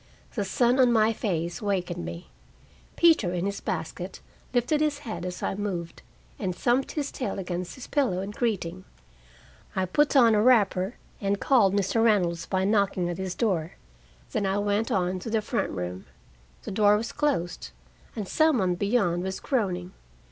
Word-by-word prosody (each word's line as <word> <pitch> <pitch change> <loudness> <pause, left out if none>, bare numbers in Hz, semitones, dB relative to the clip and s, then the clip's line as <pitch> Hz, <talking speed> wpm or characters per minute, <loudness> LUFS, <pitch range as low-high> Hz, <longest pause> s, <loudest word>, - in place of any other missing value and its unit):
The 210 - -1
sun 240 +6 +2
on 250 -2 +6
my 225 -1 +4
face 175 -5 -2
wakened 180 -4 -2
me. 170 +2 -8 0.6
Peter, 310 - +4
in 175 +1 -1
his 200 0 -3
basket, - - -4 0.3
lifted 250 +5 +1
his 300 -2 +1
head 180 -6 -4
as 180 0 -6
I - - 0
moved, 190 -4 -4 0.4
and 185 -3 -2
thumped 245 +8 +1
his 290 -2 -2
tail 255 - -3
against 180 -1 -4
his 260 - -9
pillow 255 -11 +1
in 195 +1 -5
greeting. 190 -6 -2 0.9
I 190 - +1
put 290 +12 +2
on 235 -4 +7
a 210 - +4
wrapper, 210 -4 +3 0.3
and 200 0 0
called 210 -8 +4
Mr. 200 +3 +1
Reynolds 180 -7 +2
by 190 -1 0
knocking 200 -3 +1
at 175 - -6
his 190 -1 -3
door. 180 -8 0 0.6
Then 205 -2 0
I 190 +1 0
went 205 +2 0
on 185 0 0
to 225 - -6
the 220 0 +2
front 235 +3 -1
room. 90 0 -5 0.6
The - - -6
door 205 +1 +4
was 225 +2 -4
closed, 280 - -1 0.5
and 210 -4 -4
some 315 +2 +3
one 185 -4 +1
beyond 180 -2 +1
was 190 +1 -3
groaning. 185 -8 -1
200 Hz, 170 wpm, -27 LUFS, 180-230 Hz, 0.9 s, on